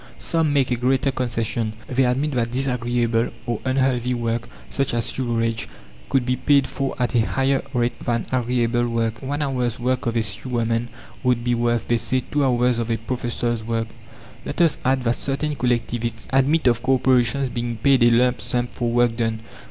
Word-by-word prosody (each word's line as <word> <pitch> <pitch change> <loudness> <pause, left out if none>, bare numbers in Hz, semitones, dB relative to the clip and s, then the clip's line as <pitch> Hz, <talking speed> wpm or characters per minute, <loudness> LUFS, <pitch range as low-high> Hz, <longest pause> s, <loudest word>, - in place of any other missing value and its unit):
Some 165 -3 0
make 135 -3 +2
a - - +3
greater 130 +3 +1
concession; 115 -3 -2
they 130 +1 +2
admit 135 +5 +1
that 120 -3 0
disagreeable 120 -2 0 0.2
or 120 -3 -2
unhealthy 130 -2 +1
work 115 -1 -2 0.2
such 135 -3 -1
as 115 - 0
sewerage 115 -3 -1 0.4
could 130 -2 +2
be 125 0 +1
paid 140 0 +3
for 135 0 -3
at 125 -1 0
a 120 - +4
higher 135 +4 +1
rate 120 -2 -1
than 120 -2 0
agreeable 120 -1 +1
work. 115 -1 -1
One 145 +3 -2
hour's 125 -4 -1
work 125 0 0
of 115 - -1
a 115 - +2
sewerman 115 +2 -1 0.3
would 125 -2 +1
be 120 0 +1
worth, 120 -1 0
they 120 - +2
say, 130 +3 -1
two 145 -1 +2
hours 125 -2 +2
of 115 0 -2
a 115 - +1
professor's 120 -1 -2
work. 115 0 -2 0.5
Let - - -5
us 170 -3 +3
add 130 0 +2
that 120 0 +1
certain 145 +2 -2
collectivists 120 -2 -1
admit 140 +4 +3
of 120 -2 +3
corporations 130 0 +2
being 120 -1 -3
paid 135 +3 +3
a 120 - +7
lump 125 +1 +3
sum 120 -1 -1
for 120 -1 -2
work 120 0 +2
done. 115 -1 -1
120 Hz, 185 wpm, -22 LUFS, 115-130 Hz, 0.5 s, a